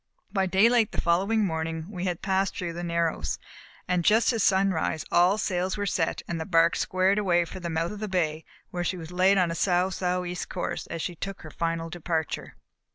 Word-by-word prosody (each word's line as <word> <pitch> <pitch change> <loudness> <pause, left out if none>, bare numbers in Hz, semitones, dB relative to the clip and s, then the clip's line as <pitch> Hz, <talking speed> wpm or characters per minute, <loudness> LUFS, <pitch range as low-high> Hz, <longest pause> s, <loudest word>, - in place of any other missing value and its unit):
By 190 -2 +1
daylight 220 +4 +4
the - - -3
following 195 +6 +2
morning 160 -2 -3
we 185 -2 -4
had 180 -2 -2
passed 195 0 0
through 175 -2 -3
the 175 +1 -5
"Narrows", 170 - -1 0.5
and 180 -1 +1
just 225 +6 +4
at 225 - 0
sunrise 190 -5 +2
all 180 +4 +4
sails 185 -2 -1
were 205 - -1
set 170 -4 -1
and 165 -1 -3
the - - -3
bark 165 -2 +4
squared 185 +2 +2
away 175 -4 +2
for 185 - -8
the 175 -1 -4
mouth 165 +1 -1
of 210 - -7
the 215 - -3
bay 160 -5 -1 0.3
where 175 -1 -2
she 180 +2 -1
was 165 0 -8
laid 185 +2 +4
on 180 -3 +2
a - - -3
sou', 180 +1 +2
sou' 180 -1 -1
east 180 0 -4
course 180 - -3
as 165 -1 -4
she 175 - -3
took 195 +3 -6
her 155 - -9
final 165 0 -2
departure. 165 -2 -3
180 Hz, 215 wpm, -27 LUFS, 165-190 Hz, 0.5 s, daylight